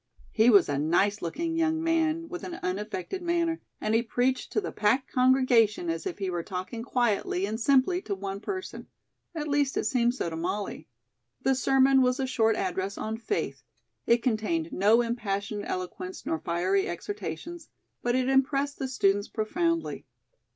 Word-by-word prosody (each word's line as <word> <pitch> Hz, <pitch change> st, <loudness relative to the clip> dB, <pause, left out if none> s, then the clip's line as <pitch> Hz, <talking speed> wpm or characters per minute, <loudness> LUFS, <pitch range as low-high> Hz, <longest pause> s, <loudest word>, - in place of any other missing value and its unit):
He 225 Hz, +2 st, +4 dB
was 200 Hz, -6 st, +6 dB
a 140 Hz, -1 st, -1 dB
nice 185 Hz, +7 st, +2 dB
looking 325 Hz, -, -2 dB
young 320 Hz, -1 st, +1 dB
man, 330 Hz, 0 st, +1 dB
with 350 Hz, +1 st, -7 dB
an 350 Hz, -, -5 dB
unaffected 210 Hz, -, -3 dB
manner, 340 Hz, -1 st, 0 dB, 0.2 s
and 215 Hz, -, -1 dB
he 225 Hz, -, +4 dB
preached 250 Hz, +2 st, -1 dB
to -, -, +1 dB
the 410 Hz, -, -4 dB
packed 240 Hz, +6 st, +1 dB
congregation 250 Hz, -8 st, +3 dB
as 165 Hz, 0 st, -4 dB
if -, -, -5 dB
he 195 Hz, -2 st, -3 dB
were 175 Hz, -1 st, -2 dB
talking 185 Hz, +6 st, -5 dB
quietly 230 Hz, -6 st, 0 dB
and 215 Hz, +2 st, -3 dB
simply 280 Hz, +9 st, +3 dB
to 200 Hz, -, -3 dB
one 195 Hz, 0 st, -5 dB
person; 375 Hz, -, -6 dB, 0.5 s
at 305 Hz, -2 st, -3 dB
least, 285 Hz, -1 st, +1 dB
it -, -, +1 dB
seemed 240 Hz, +1 st, +2 dB
so 260 Hz, -, -2 dB
to 165 Hz, -, -4 dB
Molly. 195 Hz, +5 st, -3 dB, 0.6 s
The 270 Hz, -, +3 dB
sermon 265 Hz, +1 st, +4 dB
was 250 Hz, +1 st, +2 dB
a 265 Hz, -, +1 dB
short 225 Hz, -4 st, +2 dB
address 190 Hz, 0 st, -2 dB
on 220 Hz, +1 st, -3 dB
"Faith." 325 Hz, -, -3 dB, 0.5 s
It 235 Hz, 0 st, +3 dB
contained 210 Hz, -9 st, 0 dB
no 210 Hz, +5 st, +4 dB
impassioned 205 Hz, -3 st, -3 dB
eloquence 185 Hz, 0 st, -5 dB
nor 160 Hz, -, -1 dB
fiery 185 Hz, +4 st, 0 dB
exhortations, 200 Hz, -, -6 dB, 0.3 s
but 240 Hz, 0 st, +1 dB
it 255 Hz, 0 st, +1 dB
impressed 275 Hz, +1 st, +1 dB
the 270 Hz, -, -2 dB
students 205 Hz, -5 st, +1 dB
profoundly. 335 Hz, +10 st, -1 dB
230 Hz, 170 wpm, -28 LUFS, 195-270 Hz, 0.6 s, was